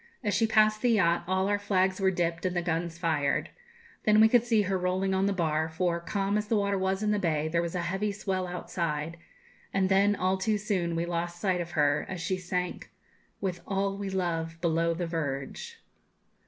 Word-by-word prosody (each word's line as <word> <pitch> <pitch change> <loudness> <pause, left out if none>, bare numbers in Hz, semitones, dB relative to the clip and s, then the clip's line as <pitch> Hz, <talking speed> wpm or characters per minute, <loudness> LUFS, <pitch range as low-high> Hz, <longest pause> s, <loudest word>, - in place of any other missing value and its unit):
As 205 -2 0
she 225 +2 +3
passed 215 0 +3
the 245 -2 +3
yacht, 170 -4 +3
all 190 +1 +1
our 205 0 +1
flags 190 -2 +1
were 190 - +4
dipped 170 -2 -1
and 185 -1 -1
the 175 - 0
guns 170 0 -2
fired. 155 -5 0 0.5
Then 215 0 +5
we 220 - +8
could 235 0 +4
see 225 -3 +2
her 195 0 -1
rolling 185 +1 0
on 190 +1 +2
the - - +2
bar, 160 -4 0
for, 170 +1 0
calm 200 +4 -1
as 210 - -4
the 225 - +1
water 200 -1 +1
was 190 +1 0
in 210 - +2
the 210 - +1
bay, 155 -4 0
there 170 +1 +1
was 170 +1 -4
a 175 - -1
heavy 195 +4 -1
swell 190 -2 -2
outside; 170 -2 -3 0.5
and 190 -1 +1
then, 200 +1 +4
all 185 0 0
too 215 +2 +1
soon, 190 -5 -1
we 165 +1 0
lost 175 0 -3
sight 185 -2 +1
of 175 0 -7
her, 145 0 +2
as 185 - -4
she 185 +3 -1
sank, 180 0 -3 0.3
'... - - -38
with 180 -3 -2
all 195 0 0
we 200 0 -4
love, 165 -3 -2
below 165 0 +1
the 175 +1 -2
verge.' 165 - -4
185 Hz, 215 wpm, -28 LUFS, 170-200 Hz, 0.5 s, we